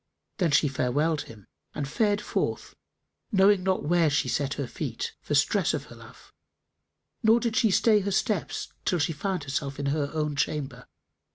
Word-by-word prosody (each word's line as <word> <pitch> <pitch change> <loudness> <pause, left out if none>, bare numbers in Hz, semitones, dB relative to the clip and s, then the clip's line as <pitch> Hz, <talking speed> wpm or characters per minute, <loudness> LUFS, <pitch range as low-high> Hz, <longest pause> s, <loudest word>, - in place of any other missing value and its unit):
Then 175 -4 +2
she 145 +1 +4
farewelled 145 +4 0
him 105 -4 -13 0.3
and 140 - -3
fared 205 - +1
forth, - - -3 0.6
knowing 195 -1 +5
not 190 0 0
where 170 0 +3
she 145 - +1
set 140 -1 -1
her 140 - -3
feet, - - -5
for - - -2
stress - - +2
of - - -5
her - - -13
love; - - -16 0.9
nor 225 +2 +5
did 235 -2 -2
she 235 -3 +4
stay 210 +2 +4
her 200 0 -2
steps 195 -1 -1
till 180 - +1
she 165 +1 0
found 185 +2 -3
herself 140 0 -3
in 140 - -2
her 145 -2 -1
own 150 -2 -2
chamber. 135 -4 -3
155 Hz, 175 wpm, -27 LUFS, 145-195 Hz, 0.9 s, knowing